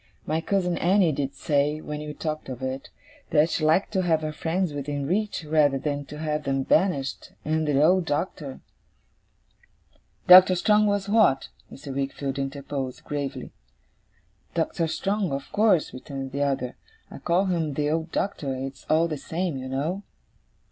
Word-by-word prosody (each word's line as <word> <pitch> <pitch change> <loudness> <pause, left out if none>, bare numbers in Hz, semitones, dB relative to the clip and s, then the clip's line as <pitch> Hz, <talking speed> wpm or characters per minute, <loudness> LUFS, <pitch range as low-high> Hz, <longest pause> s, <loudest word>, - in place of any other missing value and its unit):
My 160 +2 0
cousin 180 -1 0
Annie 185 -1 +4
did 140 -1 -3
say, 150 -1 +1
when 150 -1 -5
we 150 0 -6
talked 155 -2 -4
of 130 0 -6
it, 130 +1 -4 0.4
that 155 +1 +3
she - - -1
liked 160 +5 +3
to 190 - +2
have 165 -3 +1
her 155 - -2
friends 165 +2 -1
within 145 0 -3
reach 195 +1 -1
rather 150 -3 +3
than 145 +1 -3
to 150 - -9
have 150 -1 -2
them 135 -1 0
banished, 145 -4 0
and 155 0 0
the 140 -2 +2
old 175 +4 +4
Doctor 145 -2 -3 0.8
' 95 +5 -37
'Doctor 185 0 +9
Strong, 210 +3 +3
was 205 -1 0
that?' 205 -10 +3 0.2
Mr. 140 0 -8
Wickfield 135 0 -3
interposed, 135 -1 -4
gravely. 140 -3 -4 1.0
'Doctor 165 - 0
Strong, 195 +2 -1
of 135 0 -5
course,' 205 -6 +3
returned 135 +1 -6
the 140 +2 -3
other; 135 -3 -1 0.3
'I - - -9
call 180 +3 +1
him 165 -6 -1
the 150 0 0
old 160 +1 -2
Doctor; 145 -9 -2
it's 135 0 -7
all 160 +2 +4
the 155 -2 -3
same, 165 +2 -3
you 130 0 -5
know. 150 +9 -2
150 Hz, 165 wpm, -25 LUFS, 140-175 Hz, 1.0 s, Doctor